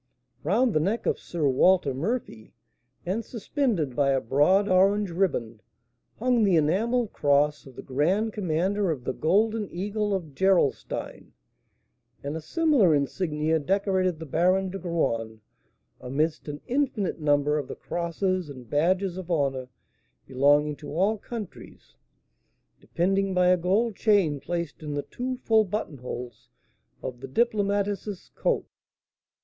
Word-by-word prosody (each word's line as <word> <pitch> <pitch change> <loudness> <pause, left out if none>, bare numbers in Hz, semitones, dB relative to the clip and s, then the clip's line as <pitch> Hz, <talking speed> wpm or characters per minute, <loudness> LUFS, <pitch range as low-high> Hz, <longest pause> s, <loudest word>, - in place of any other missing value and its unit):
Round 225 - +2
the 155 - +3
neck 200 +9 -1
of - - 0
Sir 160 -4 -2
Walter 145 +2 +3
Murphy, 140 - -4 0.5
and 195 +6 -1
suspended 225 - -2
by 140 0 +2
a 135 -1 +3
broad 150 - +3
orange 195 +1 +3
riband, 125 - -1 0.6
hung 245 0 +2
the 195 -4 +4
enamelled 210 +10 +1
cross 145 0 +1
of 130 - -14
the - - -9
grand 180 +11 0
commander 190 +1 0
of 145 -6 -2
the 130 - -2
Golden 210 - +1
Eagle 205 +3 -2
of 165 -6 -5
Gerolstein; 190 -3 0 0.9
and 140 +2 -4
a 160 - -4
similar 255 - +3
insignia 155 +2 0
decorated 185 +1 0
the 160 - -8
Baron 185 +5 +1
de 195 - -5
Graün, 115 -11 -2 0.6
amidst 150 +6 -2
an 145 0 -6
infinite 245 -9 -1
number 150 0 +2
of 140 - -5
the - - -6
crosses 175 0 -2
and 130 -4 -10
badges 180 - +1
of 185 -2 -7
honour 135 -6 -1 0.6
belonging 145 +3 +3
to 145 - -10
all 200 +5 +1
countries, 220 -2 -9 0.8
depending 195 +2 0
by 180 0 +4
a 180 - +6
gold 200 +6 +1
chain 190 -10 +2
placed 170 +2 -4
in 150 -2 -5
the 145 - -2
two 255 +1 -4
full 220 -1 +4
buttonholes 125 - -6 0.5
of 125 -2 -5
the 135 - -7
diplomatist's 205 - -1
coat. - - 0
175 Hz, 135 wpm, -26 LUFS, 145-200 Hz, 0.9 s, a